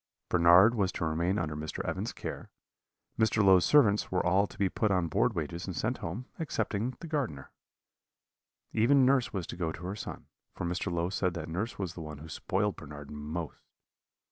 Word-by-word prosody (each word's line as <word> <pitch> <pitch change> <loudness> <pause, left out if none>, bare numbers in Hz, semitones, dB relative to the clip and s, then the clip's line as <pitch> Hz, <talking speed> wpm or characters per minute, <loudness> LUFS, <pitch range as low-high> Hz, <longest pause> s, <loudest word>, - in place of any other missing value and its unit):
Bernard 85 +6 +7
was 100 -5 +1
to - - -2
remain 85 +5 0
under 75 -3 -2
Mr. 75 +1 -5
Evans's - - -2
care; - - -7 0.7
Mr. 110 -1 +3
Low's 95 -2 +6
servants 110 -9 +4
were 90 -1 +1
all 95 +3 +3
to - - -15
be 100 - +2
put 110 +3 0
on 90 -3 +1
board 105 +8 +1
wages 85 +2 -4
and 95 - -4
sent 120 +8 -1
home, 100 +6 -5
excepting 120 -5 -2
the 170 - -6
gardener. 130 - -3 1.2
Even 130 +4 +5
nurse 130 -2 +3
was 95 -5 -3
to - - -7
go 85 -2 -2
to 85 +2 -8
her 95 +2 -3
son, 105 - -7 0.3
for - - -4
Mr. 90 +1 -2
Low 85 +1 -1
said 90 -3 0
that 80 -2 -5
nurse 95 +8 -3
was 95 -4 -3
the 85 - -8
one 75 -2 -7
who 80 +3 -10
spoiled 100 +6 -1
Bernard 75 -1 -9
most. 75 +2 -5
90 Hz, 195 wpm, -30 LUFS, 85-110 Hz, 1.2 s, Bernard